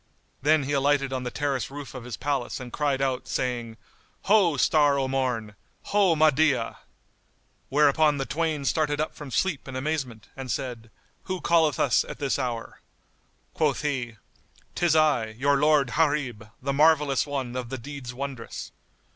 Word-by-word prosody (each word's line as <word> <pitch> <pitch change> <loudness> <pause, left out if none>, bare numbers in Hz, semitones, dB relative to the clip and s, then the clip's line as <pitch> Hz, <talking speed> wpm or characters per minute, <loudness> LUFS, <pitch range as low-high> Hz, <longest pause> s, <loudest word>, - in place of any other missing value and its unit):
Then 150 +1 +3
he 135 - -3
alighted 140 -1 +2
on 130 - -2
the 125 - -3
terrace 140 0 -2
roof 145 0 -8
of 125 -3 -8
his 125 - -6
palace 140 -4 -2
and 125 -2 -9
cried 140 -3 0
out, 130 -1 -1
saying, 120 -3 -2 0.5
"Ho, 195 -7 +4
Star 145 0 +4
o' 135 -1 0
Morn! 125 -5 -1 0.4
Ho, 195 -5 +4
Mahdiyah!" 150 -5 +3 0.9
Whereupon 150 +1 +4
the 135 - -2
twain 155 -1 -1
started 145 0 +1
up 155 - -1
from 145 -2 -9
sleep 160 +2 -1
in 130 - -7
amazement 130 -5 -3
and 130 -1 -7
said, 120 -2 -4 0.4
"Who 185 -1 -3
calleth 160 -6 +2
us - - +3
at - - -8
this 140 0 -1
hour?" 120 -3 -4 0.7
Quoth 150 -3 0
he, 125 -6 -2 0.6
"'Tis 170 -2 +2
I, 140 -9 +2
your 140 +3 +3
lord, 150 -2 +3
Gharib, 145 -9 0
the 140 +2 -2
Marvellous 150 -2 +3
One 135 -4 -3
of 125 -2 -4
the 130 - -4
deeds 135 0 -7
wondrous." 130 -2 -6
140 Hz, 160 wpm, -26 LUFS, 125-150 Hz, 0.9 s, Ho